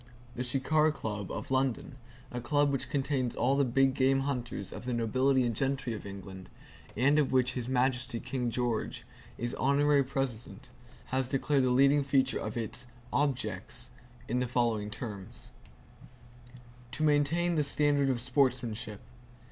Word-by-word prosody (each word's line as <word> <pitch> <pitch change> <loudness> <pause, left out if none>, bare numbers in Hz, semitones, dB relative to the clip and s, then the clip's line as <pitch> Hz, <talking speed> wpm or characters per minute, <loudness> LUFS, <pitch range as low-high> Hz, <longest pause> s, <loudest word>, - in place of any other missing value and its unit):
The 125 - -2
Shikar 150 +5 +2
Club, 105 -8 -5
of - - -6
London, 130 0 0 0.4
a 125 - -4
club 145 +3 +2
which 135 - -2
contains 135 -3 -1
all 135 +3 +2
the 140 - +3
big 135 +1 +3
game 135 +1 +3
hunters 130 -3 -3
of - - -8
the 125 - -1
nobility 130 +4 +2
and 115 -2 -1
gentry 135 -1 -1
of 105 -2 -7
England, 95 -1 -9 0.5
[Q] 120 - -1
and 145 +2 +5
of 145 - +1
which 125 -1 +2
His 125 -1 -4
Majesty 125 -2 0
King 125 -1 -2
George 120 -1 -2 0.3
is 120 +1 -3
Honorary 140 +1 +3
President, 130 -3 -4 0.4
has 130 -1 +1
declared 135 0 +2
the - - +2
leading 140 +3 +5
feature 135 -1 +1
of 110 +1 -4
its 120 +2 -4 0.3
"Objects" 125 -3 -2 0.4
in 125 +2 0
the 125 - 0
following 115 -4 0
terms: 105 -4 -8 1.4
"To 155 - -2
maintain 155 +4 +2
the 155 -2 +2
standard 145 -1 +2
of 125 -2 0
sportsmanship. 125 -4 0
130 Hz, 155 wpm, -30 LUFS, 120-140 Hz, 1.4 s, and